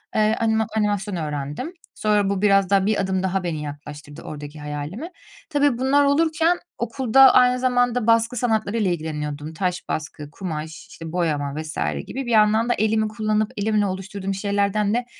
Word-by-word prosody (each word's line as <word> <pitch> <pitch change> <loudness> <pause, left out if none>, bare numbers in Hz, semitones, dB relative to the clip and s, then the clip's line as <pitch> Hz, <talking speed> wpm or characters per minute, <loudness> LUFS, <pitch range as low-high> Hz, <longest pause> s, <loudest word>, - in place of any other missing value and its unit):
Eee, 215 0 +3
anima 220 -1 +1
animasyon 205 -2 0
öğrendim. 150 - -4 0.2
Sonra 210 -2 +1
bu 200 -1 -1
biraz 195 -2 +4
daha, 195 -1 +3
bir 215 0 +1
adım 190 0 -1
daha 190 0 -1
beni 160 -3 -3
yaklaştırdı 145 0 -9
oradaki 150 0 -8
hayalime. 150 - -6 0.4
Tabii, 285 -4 +2
bunlar 270 +3 +3
olurken 325 +4 +2 0.2
okulda 255 +2 +5
aynı 250 0 +5
zamanda 245 -2 +1
baskı 230 +2 +3
sanatlarıyla 220 -3 0
ilgileniyordum. 150 -2 -4
Taş 180 +1 -2
baskı, 150 -1 -5
kumaş, 160 -3 -6
işte, 165 -1 -9
boyama 150 -5 -1
vs. 155 0 -6 0.3
gibi, 270 +1 -5
bir 240 - -3
yandan 220 +2 +4
da - - +4
elimi 220 0 +1
kullanıp, 215 0 -1
elimle 210 0 +1
oluşturduğum 195 +1 -4
şeylerden 200 +1 0
de 240 0 0
205 Hz, 160 wpm, -22 LUFS, 160-230 Hz, 0.4 s, okulda